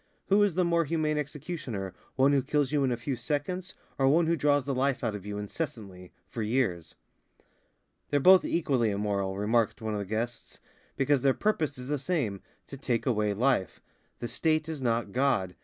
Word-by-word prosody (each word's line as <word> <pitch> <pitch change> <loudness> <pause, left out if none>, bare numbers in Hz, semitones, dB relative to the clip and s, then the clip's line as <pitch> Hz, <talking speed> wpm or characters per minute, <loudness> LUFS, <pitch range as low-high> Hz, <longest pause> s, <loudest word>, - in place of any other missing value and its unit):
Who 200 +1 +5
is 205 -5 +2
the 180 -1 +2
more 170 -1 +2
humane 155 0 0
executioner, 140 - -5 0.2
one 135 +2 +4
who 140 - +3
kills 145 0 0
you 145 -2 +2
in 130 - +1
a 120 - 0
few 130 +3 -3
seconds 150 +9 -3 0.2
or 135 - +4
one 160 +5 +4
who 165 +1 +2
draws 145 -2 +2
the 140 - -1
life 135 0 0
out 115 -3 0
of 105 -1 -7
you 105 0 -4
incessantly, 105 - -6 0.2
for 115 - -5
years?" 105 -8 -1 1.1
"They're 145 - +2
both 185 +5 +7
equally 135 -9 +1
immoral," 100 -1 -1
remarked 110 +3 +1
one 110 -1 -3
of 105 - -2
the 100 - -3
guests, 115 +4 -4 0.4
"because 135 0 +2
their 135 0 +3
purpose 160 -10 0
is 125 0 -8
the 145 -1 0
same, 130 - -1 0.2
to 140 - -9
take 125 -3 -1
away 105 -5 +1
life. 120 -4 +1 0.4
The 120 - -4
State 155 +6 0
is 160 -4 -5
not 115 -4 0
God. 125 -8 +1
130 Hz, 190 wpm, -29 LUFS, 110-150 Hz, 1.1 s, both